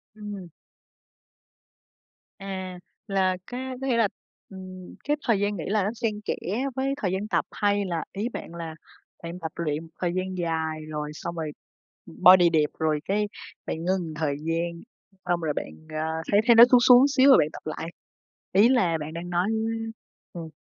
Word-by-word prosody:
Ừm. 205 -4 -7 1.9
À, 190 -2 -6 0.3
là 190 -2 +1
cá 255 +1 -5
có 270 - -2
nghĩa 245 -3 +2
là, 225 -2 +4 0.4
ừm, 185 -1 -10
cái 295 +1 0
thời 225 -5 +3
gian 205 0 0
nghỉ 160 - -4
là 210 0 +1
nó 200 - 0
xen 215 -2 -2
kẽ - - 0 0.4
với 270 +1 0
thời 185 - 0
gian 195 +3 -2
tập, - - +1
hay 205 -1 +1
là 170 -3 -2
ý 210 +4 -2
bạn 170 - -7
là 165 -2 -6 0.5
bạn 170 +2 -6
tập 160 -2 -5
luyện 155 -2 -2
một 165 - -14
thời 175 -1 0
gian 185 0 -2
dài 160 -2 -2
rồi 150 -1 -4
xong 170 +2 -6
rồi, 160 -2 -3 0.5
ừm, 80 - -13
body 180 -1 +9
đẹp 155 -2 +2
rồi 155 -1 +1
cái 210 +2 0 0.4
bạn - - -3
ngưng 190 +1 +2
một 160 -2 -6
thời 150 -2 -1
gian, 170 +1 -2 0.4
xong 175 -1 +1
rồi 155 -2 -1
bạn, - - -5 0.2
à, 155 0 -2 0.2
thấy 205 - +5
thấy 235 - +7
nó 230 - +11
xuống 250 - +8
xuống 250 +2 +7
xíu 280 -1 +5
rồi 265 - +9
bạn 150 - +3
tập - - -9
lại? 155 +1 -4 0.6
Ý 205 +6 +6
là 180 -11 +3
bạn 155 +1 -6
đang 170 +1 -6
nói 175 +2 +1 0.9
ừm. 165 -2 -7
185 Hz, 190 wpm, -26 LUFS, 165-210 Hz, 1.9 s, nó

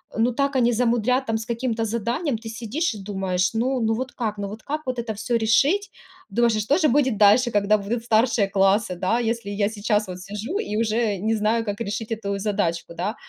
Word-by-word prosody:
ну 235 +2 +2
так 275 +2 -1
они 240 -1 +3
замудрят 240 +2 +1
там 225 -2 0
с 220 - -6
каким-то 230 -1 -2
заданием. 235 - -1
Ты 225 0 -10
сидишь 235 +7 -2
и 210 - -8
думаешь: 190 -2 -1
"Ну, 255 +3 +1
ну 220 0 +1
вот 255 +1 -4
как, 215 -3 -3
ну 200 0 -3
вот 215 +2 -8
как 300 +2 -4
вот 255 -1 -3
это 225 -2 -3
всё 230 +3 -1
решить?" 280 - +2 0.4
Думаешь: 235 +2 +2
"А - - 0
что 275 +9 +2
же 310 - +3
будет 260 -4 +2
дальше, 220 +4 +5
когда 205 +1 +3
будут 225 +4 -3
старшие 225 -2 +2
классы, 195 0 +2
да, 185 +6 0
если 230 -3 -2
я 205 0 0
сейчас 210 -1 0
вот 185 0 -7
сижу 210 - -4
и 210 +1 -3
уже 220 -2 +1
не 220 +4 0
знаю, 220 +2 +1
как 205 +2 -4
решить 225 +1 -4
эту 200 -3 -2
задачку, 170 -5 -2
да?" 190 +7 -3
225 Hz, 215 wpm, -23 LUFS, 205-240 Hz, 0.4 s, дальше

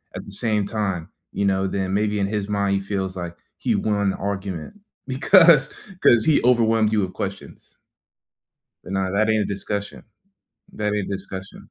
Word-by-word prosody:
at - - -6
the - - -11
same 105 -1 0
time, 95 -6 -3 0.2
you 100 - -1
know, 95 0 +1
then 95 0 -2
maybe 105 0 0
in 100 - +1
his 105 -1 -2
mind, 100 -1 0
he - - +1
feels 95 -1 -3
like 85 -1 -5 0.2
he - - 0
won 100 -2 +1
the - - -6
argument 100 - -5 0.3
because 155 +1 +6 0.3
‘cause 120 -2 +6
he 155 -2 +4
overwhelmed 115 -3 +3
you 105 - +3
with 95 -1 -3
questions. 95 0 -7 1.1
But 95 - -7
nah, 95 -1 0
that 110 +2 +2
ain't 110 -1 +2
a - - -4
discussion. 100 +1 -4 0.7
That 105 -1 -2
ain't 105 -2 -2
a - - -2
discussion. 95 -1 -8
100 Hz, 180 wpm, -22 LUFS, 95-110 Hz, 1.1 s, because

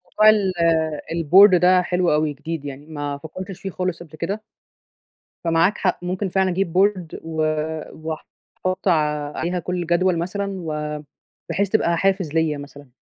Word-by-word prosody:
موضوع 215 0 +7
ال 205 -3 +3 0.6
الboard 180 +4 +6
ده 180 +1 +5
حلو 180 -1 +1
أوي، 150 0 +1
جديد 155 +1 -6
يعني، 140 +1 -7
ما 145 -2 -4
فكّرتش 185 +5 -8
فيه 195 - -4
خالص 180 -2 -3
قبل 155 -2 -14
كده 200 +7 -3 1.0
فمعاك 165 +4 +2
حق 185 - 0
ممكن 185 +2 -2
فعلًا 190 +1 +2
أجيب 180 -2 -1
board، 190 -4 +1
و 160 -1 -3 0.5
واحط 160 +4 -6
عليها 155 +1 0
كلّ 180 +2 -3
الجدول 175 +1 +2
مثلًا 200 +4 -3
و 150 -2 -3 0.5
بحيث 200 0 0
تبقى 170 -5 +2
حافز 190 -4 +1
ليّا 160 -2 +1
مثلًا. 145 0 -11
170 Hz, 150 wpm, -22 LUFS, 155-185 Hz, 1.0 s, موضوع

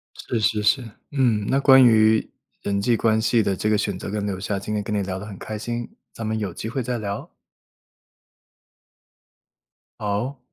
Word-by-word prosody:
是 115 - -3
是 105 0 +1
是。 110 +3 +2 0.2
嗯， 120 -7 +1
那 135 - +2
关 135 -1 +7
于 110 -2 +4 0.3
人 100 0 -1
际 115 +3 +2
关 110 -1 +2
系 115 +1 +3
的 100 -2 0
这 105 - -1
个 105 - +4
选 100 -2 -2
择 100 - -6
跟 105 0 -2
留 95 -2 -3
下， 100 +1 -2
今 105 +2 -4
天 105 - -1
跟 105 +1 -3
你 100 - +1
聊 95 -1 -4
得 100 - -8
很 105 -2 -8
开 110 -1 -6
心， 120 +2 -4 0.2
咱 115 - -6
们 110 0 -1
有 100 -4 -3
机 110 - -6
会 130 +3 -2
再 120 0 -2
聊。 100 -2 -5 2.7
好。 105 +7 -2
110 Hz, 205 characters per minute, -23 LUFS, 100-115 Hz, 2.7 s, 关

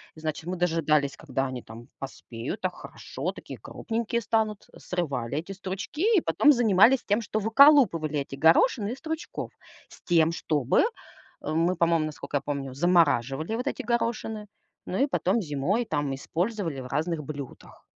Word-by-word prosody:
значит, 155 0 -4
мы 180 +1 -3
дожидались 155 -5 +1
когда 135 -3 -2
они 130 -2 -6
там 115 +2 -12
поспеют 130 - -7
так 185 -1 -2
хорошо, - - -6
такие - - -10
крупненькие 235 +1 -3
станут, 220 -2 -1
срывали 140 -8 -3
эти 170 +5 -4
стручки 200 - -1
и - - +4
потом 170 - +4
занимались 235 0 +5
тем, 210 +3 +1
что 215 0 -2
выколупывали 220 - +5
эти 140 0 -5
горошины 200 - +4
из 265 - -10
стручков 320 0 -5 0.4
с - - -17
тем, 165 -2 +3
чтобы, 145 -6 +1 0.6
э, - - -4
мы 165 +3 +2
по-моему, 165 -2 +2
насколько 150 -1 -4
я - - -3
помню, 140 -2 -4
замораживали 160 - +2
вот 245 - -3
эти - - -2
горошины. 225 -2 -2 0.4
Ну 185 - -3
и - - +2
потом 235 -4 +1
зимой 175 - -1
там 145 -7 -1
использовали 170 +1 -3
в 125 - -7
разных 155 +3 -2
блюдах. 140 -2 -9
170 Hz, 155 wpm, -27 LUFS, 145-220 Hz, 0.6 s, занимались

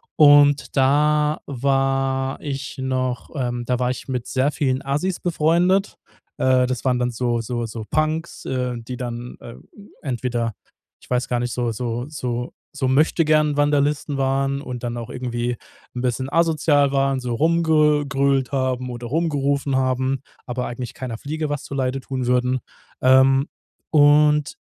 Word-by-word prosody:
Und 145 -1 +5
da 150 +2 +3
war 135 0 0
ich 140 -2 -5
noch, 130 -1 -2
ähm 120 -2 -2
da 125 0 0
war 125 0 0
ich - - -7
mit 125 -3 -3
sehr 135 +3 0
vielen 135 -4 0
Assis 150 +7 -1
befreundet. 175 +4 +2 0.4
Äh, 130 -1 +3
das 130 +1 -4
waren 125 -1 +2
dann 125 0 0
so 120 0 -1
so 120 +1 -3
so 110 0 -6
Punks, 155 +2 -1
äh, 125 -1 -2
die 115 +2 -7
dann, 120 0 -6
äh, 115 - -10 0.5
entweder 120 -4 -2 0.5
ich - - -19
weiß 125 0 0
gar 120 - 0
nicht, 120 -1 -2
so 120 -2 -1
so 120 +1 -3
so 125 -5 -4 0.2
so 135 -3 -1
Möchtegern-Vandalisten 150 0 +2
waren 135 +1 0
und 125 -3 -7
dann 120 0 -3
auch 115 -1 -6
irgendwie 120 -1 -3 0.4
'n 125 - -3
bisschen 130 +1 -1
asozial 155 -4 +3
waren, 135 -1 +1
so 125 -1 -3
rumgegrölt 150 -4 +2
haben 130 -1 -1
oder 120 -1 -6
rumgerufen 140 -2 0
haben, 130 0 0 0.2
aber 125 0 -3
eigentlich 120 -1 -6
keiner 125 -3 -6
Fliege 155 +4 -4
was 145 -1 -3
zuleide 135 -1 -2
tun 130 -1 -4
würden. 125 +1 +1 0.4
Ähm, 130 +1 +5 0.4
und 150 0 +4
135 Hz, 150 wpm, -22 LUFS, 125-145 Hz, 0.5 s, Und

